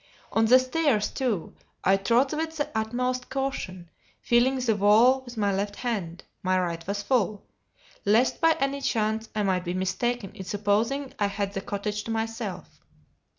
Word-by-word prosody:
On 225 - +3
the 250 +3 +7
stairs, 255 -4 +1
too, 240 - -2 0.3
I 195 - +5
trod 235 +8 +2
with 320 +1 -3
the 290 - -1
utmost 250 +3 -1
caution, 185 -11 -4 0.3
feeling 240 +3 +3
the 245 -4 +1
wall 220 +6 +5
with 245 -2 -11
my 205 -2 +1
left 200 +1 -2
hand 195 -9 -3 0.2
(my 185 0 +2
right 170 -2 -3
was 200 +1 -2
full), 215 -5 0 0.6
lest 220 +5 +3
by 325 -1 +4
any 275 +1 -1
chance 220 -2 0
I 210 - +1
might 185 -2 +1
be 175 0 -3
mistaken 195 +4 -1
in 200 -2 -8
supposing 215 +8 0
I 205 - +3
had 200 0 -3
the 195 - -3
cottage 205 +1 -3
to - - -7
myself. 225 0 -4
220 Hz, 165 wpm, -26 LUFS, 200-255 Hz, 0.6 s, the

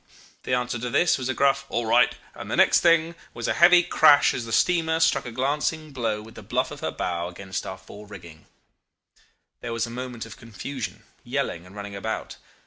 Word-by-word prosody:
The 125 - +1
answer 125 -1 -2
to 125 +1 -3
this 175 +6 +2
was 130 0 -3
a 130 - -1
gruff 140 0 +2
'All 120 - -1
right,' 110 - +4 0.2
and - - -9
the - - -1
next - - +5
thing 165 -1 +3 0.2
was 120 -1 -4
a - - +1
heavy 175 +2 +6
crash 150 -3 +5
as 120 - -4
the 115 - -7
steamer 160 +4 +2
struck 150 -5 +2
a - - -6
glancing 150 +5 -1
blow 115 -5 -2
with 110 +1 -13
the - - -11
bluff - - -1
of - - -8
her - - -2
bow 85 -1 -3
about 95 +1 -6
our 95 - -6
fore 100 +3 -13
rigging. 85 -6 -13 1.1
There 115 - -5
was 115 -1 -1
a 115 - -9
moment 125 -1 -6
of 105 -4 -11
confusion, 120 +3 -7 0.2
yelling, 85 +2 -3
and 95 - -15
running 100 -1 -7
about. 110 +3 -5
120 Hz, 210 wpm, -25 LUFS, 105-145 Hz, 1.1 s, heavy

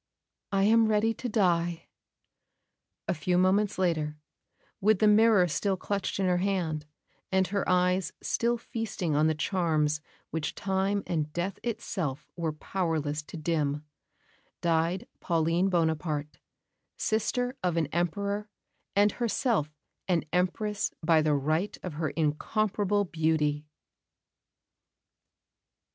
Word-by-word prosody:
I 195 -1 +2
am 225 +2 +5
ready 220 +1 +2
to 245 +2 -5
die." 175 -5 +1 1.2
A - - +2
few 175 +4 0
moments 195 +3 +3
later, 160 -5 0 0.6
with 215 +1 +4
the 215 - +4
mirror 210 -3 +6
still 190 +5 0
clutched 200 +1 -2
in 195 - +2
her 180 -1 +2
hand, 175 -6 -1 0.4
and 190 0 +3
her 200 +2 -1
eyes 180 +1 +2
still 235 +1 0
feasting 215 -9 -3
on 155 +2 +4
the 160 - +1
charms 155 -3 +1 0.3
which 160 -1 -2
time 195 +1 0
and 155 -3 -1
death 180 +3 -2
itself 180 - -3
were 165 -2 -1
powerless 155 -2 -2
to 150 - -10
dim, 150 -2 -1 0.7
died 170 +2 +1
Pauline 170 +3 +1
Bonaparte, 160 -3 -1 0.6
sister 245 +4 0
of 175 -2 0
an 165 - +2
Emperor 200 +5 -1 0.5
and 205 +1 +5
herself 225 - 0 0.3
an 175 -3 +2
Empress 200 +4 0 0.2
by 160 -1 +5
the 150 -1 +2
right 155 +8 0
of 180 - -4
her 155 0 -1
incomparable 205 +7 0
beauty. 155 -3 0
180 Hz, 120 wpm, -29 LUFS, 155-200 Hz, 1.2 s, mirror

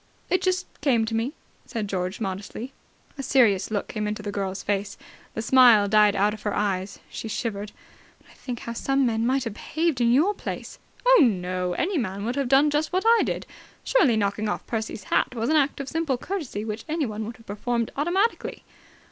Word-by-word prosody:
"It 370 - +3
just 370 -1 +1 0.2
came 245 -6 +3
to 225 - -4
me," 230 +5 -1 0.3
said 225 -4 -3
George 185 -1 -3
modestly. 205 +5 -5 0.5
A - - 0
serious 230 -8 +3
look 210 -2 -2
came 210 -1 -3
into 210 0 -4
the 205 - -3
girl's 195 -1 -3
face. 200 0 -2 0.4
The 220 - -2
smile 235 -4 +6
died 210 0 +5
out 205 +2 +2
of 215 - -9
her 210 - -2
eyes. 195 -1 -1
She - - -6
shivered. 210 -2 -3 0.5
"When - - -23
I - - -18
think 245 -3 -6
how 235 - -5
some 270 +3 +1
men 225 -1 +1
might 265 +1 +1
have 230 -4 -4
behaved 315 +3 -1
in 235 0 +4
your 315 +12 +4
place!" - - -6 0.3
"Oh, - - +7
no. 180 -6 +1
Any 345 - 0
man 200 -3 -3
would 240 +2 -1
have 275 -3 -1
done 280 +3 +5
just 300 +1 0
what 370 +1 +1
I 460 0 +6
did. - - -3 0.4
Surely, 280 - +3
knocking 205 +1 0
off - - -3
Percy's 220 -3 -4
hat 250 - 0
was 230 +4 0
an - - +3
act 285 -2 +2
of 275 - -4
simple 320 -4 -1
courtesy 275 - -4
which 215 0 -4
anyone 255 -10 -2
would 230 +2 -7
have 230 - -19
performed 230 +3 -2
automatically!" 370 +10 0
230 Hz, 205 wpm, -25 LUFS, 205-275 Hz, 0.5 s, Oh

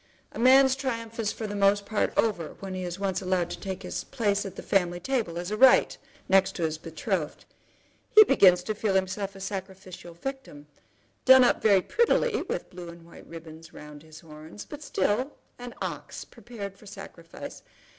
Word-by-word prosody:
A - - -9
man's 265 +2 +6
triumph 230 -4 -5
is 215 -2 0
for 220 - -6
the 205 - -5
most 200 0 +2
part 215 +1 -1
over 195 -8 0
when 195 -1 -7
he 185 0 -4
is 175 0 -5
once 195 -1 -2
allowed 185 -2 -1
to - - -6
take 190 -1 -6
his 180 - -4
place 205 -6 -1
at 190 - -10
the - - -8
family 175 -2 0
table, 215 -5 -2
as 175 +3 -5
a 215 - -2
right, 260 +3 +5 0.3
next 195 0 +3
to 175 - -3
his 160 -1 -2
betrothed. 165 0 -4 0.7
He 430 - +11
begins 185 - +5
to 215 - -2
feel 210 -2 -1
himself 190 +1 -1
to - - -24
be - - -10
a - - -11
sacrificial 190 -3 -8
victim, 220 - -7 0.6
done 260 0 +8
up 245 - +2
very 200 -4 +4
prettily 470 0 +1
with - - -5
blue 175 -1 -9
and 170 0 -13
white 170 - -15
ribbons 165 -1 -12
round 150 -1 -11
his 155 0 -14
horns, 155 +4 -11
but 295 - -10
still 250 +2 -1 0.3
an 245 0 -9
ox - - -6
prepared 200 -5 -10
for 210 - -16
sacrifice. 195 -5 -10
195 Hz, 195 wpm, -27 LUFS, 175-225 Hz, 0.7 s, He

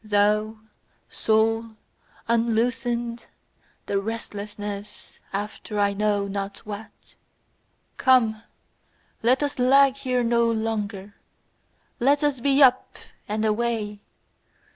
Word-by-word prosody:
Thou, 210 +1 +1 0.5
soul, 225 +1 +1 0.5
unloosenâd 235 +1 0 0.6
the 200 -1 -1
restlessness 205 -1 -7
after 210 +1 -5
I 200 -1 +2
know 205 0 0
not 200 0 -4
what; 215 +1 -10 0.8
Come, 230 -4 +3 0.8
let 255 +5 +3
us 285 -2 -3
lag 270 +1 +5
here 255 -3 0
no 235 0 +2
longer, 210 -3 -3 0.9
let 285 +4 +3
us 290 -3 +1
be 275 +2 +4
up 255 -1 +3 0.3
and 215 +1 -1
away! 215 -2 -1
225 Hz, 95 wpm, -24 LUFS, 210-240 Hz, 0.9 s, lag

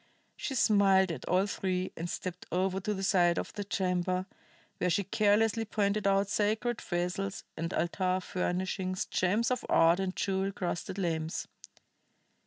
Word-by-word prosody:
She 270 - -4
smiled 195 -5 +4
at 150 -6 -6
all 185 +2 +2
three, 185 -2 -2
and 170 +1 -4
stepped 180 0 -5
over 185 +1 0
to 210 +2 -2
the 195 - -4
side 175 -4 +3
of - - -3
the 205 - -4
chamber, 185 -2 -1 0.5
where 180 - +1
she 200 +4 +2
carelessly 215 +3 +2
pointed 205 -1 0
out 195 0 +3
sacred 220 +3 0
vessels 180 +2 -2
and 165 +1 -3
altar 185 +2 0
furnishings, 185 0 -2
gems 210 +7 +1
of 250 - -1
art 165 +2 +5
and 190 -1 -2
jewel 195 0 0
crusted 180 0 -3
lamps. 160 -4 -2
190 Hz, 150 wpm, -30 LUFS, 180-205 Hz, 0.5 s, art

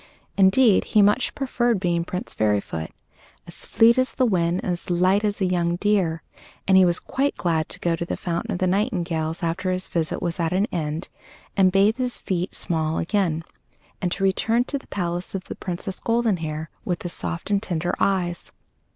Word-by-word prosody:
Indeed, 200 +3 +5
he 210 - +8
much 210 +6 +2
preferred 240 -5 0
being 175 -2 0
Prince 180 +2 -5
Fairyfoot, 100 -7 -1 0.6
as - - -8
fleet 235 +3 +5
as 255 - 0
the 255 - +3
wind 175 -5 +1
and 185 - -1
as 175 0 -5
light 185 +4 +3
as 205 0 -1
a - - +3
young 175 -2 +1
deer, 180 -5 +1 0.4
and 190 - +5
he 190 - +8
was 175 0 +2
quite 280 +2 -1
glad 160 -3 0
to - - -6
go 170 -1 +1
to 165 - -4
the 170 - -4
fountain 170 -1 -3
of - - -1
the 185 - 0
nightingales 175 -5 -1
after 170 +3 -1
his 185 0 -2
visit 165 -2 -2
was 175 0 -3
at 165 0 0
an 195 +3 +2
end, 155 -1 -3 0.5
and 190 -2 +4
bathe 200 +4 +3
his 250 -1 -2
feet 180 -1 -3
small 160 -1 -1
again, 165 -3 0 0.6
and 180 - 0
to 195 - -3
return 225 +5 +2
to 280 +2 -4
the - - -20
palace 175 -1 -3
of 190 - -3
the - - -7
Princess 185 +1 -5
Goldenhair 175 -10 -1
with 175 -2 -2
the - - -4
soft 170 +3 -4
and 200 -1 +2
tender 175 -4 -2
eyes. 175 -3 0
180 Hz, 195 wpm, -23 LUFS, 170-205 Hz, 0.6 s, he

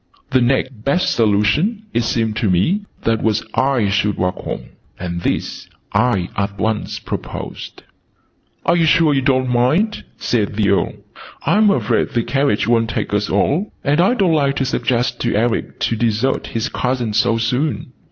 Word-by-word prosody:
The 130 - +3
next 125 -2 0
best 140 +8 +1
solution, 115 - +2
it 120 - +2
seemed 115 -2 -1
to 115 -4 +1
me, 175 - +1 0.2
was 110 -1 +1
that - - -17
I 130 -5 +1
should 100 0 0
walk 90 0 0
home: - - -6 0.3
and 85 -1 -4
this - - -3 0.2
I 110 -8 +2
at 100 0 -2
once 110 0 -2
proposed. - - -7 0.8
"You're - - +4
sure 160 -3 +4
you 135 - +2
don't 130 -1 +2
mind?" 150 - +1
said 105 -4 -1
the 105 -1 +1
Earl. 100 - +1 0.5
"I'm 210 0 +4
afraid 200 - +1
the 120 - -1
carriage 135 -4 +1
wont 115 -1 +2
take 115 - -3
us 105 0 0
all, 145 - +1
and 145 +3 +2
I 195 +8 +3
don't 190 -7 +2
like 140 -3 +2
to 135 - 0
suggest 120 -2 -1
to 120 - 0
Eric 115 +2 -1
to 115 - +1
desert 115 +3 0
his 115 +2 -2
cousin 125 -5 -2
so 115 +2 +2
soon." 125 +3 -1
120 Hz, 165 wpm, -18 LUFS, 110-140 Hz, 0.8 s, You're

